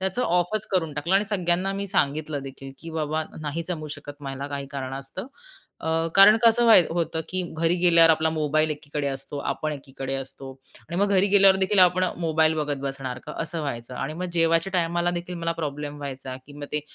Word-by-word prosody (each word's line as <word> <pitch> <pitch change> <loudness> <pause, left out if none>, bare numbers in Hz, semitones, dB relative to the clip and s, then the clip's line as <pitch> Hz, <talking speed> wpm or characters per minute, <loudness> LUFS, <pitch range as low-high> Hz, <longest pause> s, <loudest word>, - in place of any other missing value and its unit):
त्याचं 190 +6 -1
ऑफच 180 +3 0
करून 165 -5 +1
टाकलं 165 +6 -1
आणि 200 +2 +4
सगळ्यांना 185 -2 0
मी 200 +1 -3
सांगितलं 150 -4 -1
देखील, 135 0 -9
की 165 - -9
"बाबा 155 -1 -2
आता 155 - -8
नाही 155 +2 -3
जमू 155 -4 -4
शकत 145 0 -11
मला 135 0 -5
काही 140 -1 -5
कारणास्तव." 135 - -6 0.5
अ, 160 0 0
कारण 200 +2 +8
कसं 235 +1 +5
व्हाय 225 -5 +8
होतं, 165 -1 -1
की 185 - -1 0.2
घरी 165 +1 +2
गेल्यावर 170 -2 +6
आपला 160 0 +2
मोबाईल 155 0 +1
एकीकडे 145 -1 -4
असतो, 135 +1 -4
आपण 155 +2 -2
एकीकडे 135 -1 -6
असतो 135 0 -7 0.4
आणि 170 - -4
मग 205 - +3
घरी 190 +1 +4
गेल्यावरदेखील 195 0 +5
आपण 180 0 +5 0.2
मोबाईल 160 -1 +2
बघत 150 -2 -1
बसणार 135 -2 -4
का, - - -6
असं 165 0 -4
व्हायचं 125 -4 -5
आणि 135 +4 -4
मग 180 +3 -4
जेवायच्या 165 +2 +2
टायमालादेखील 175 0 -1
मला 165 0 -1
प्रॉब्लेम 150 -2 -5
व्हायचा, 135 -2 -6
की 145 - -13
मग 145 - -6
ते 150 - 0
160 Hz, 190 wpm, -25 LUFS, 145-175 Hz, 0.5 s, कारण